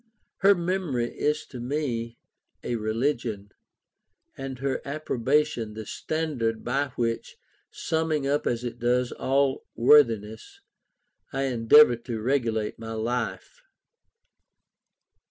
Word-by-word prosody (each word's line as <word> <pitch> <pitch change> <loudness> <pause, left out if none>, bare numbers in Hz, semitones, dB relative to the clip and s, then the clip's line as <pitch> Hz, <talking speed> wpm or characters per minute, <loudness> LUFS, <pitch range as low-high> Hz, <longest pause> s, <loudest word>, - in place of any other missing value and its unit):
Her 200 +1 +5
memory 170 -9 -1
is 150 +1 0
to 125 - -10
me 120 -3 -3 0.5
a 120 - -2
religion, 110 -2 -2 0.8
and 135 -1 -6
her 135 +1 -2
approbation 135 -5 -1
the 110 0 -6
standard 130 -7 -2
by 140 +4 0
which, 115 -1 -2 0.3
summing 160 -3 -1
up 145 +2 0
as 120 0 -1
it 120 -1 -5
does 125 +1 +1
all 135 0 0
worthiness, 115 -5 +3 0.7
I 135 +1 -1
endeavour 125 +1 +6
to 115 -1 -5
regulate 115 -4 -1
my 115 0 -6
life. 120 - -3
125 Hz, 105 wpm, -26 LUFS, 115-145 Hz, 0.8 s, endeavour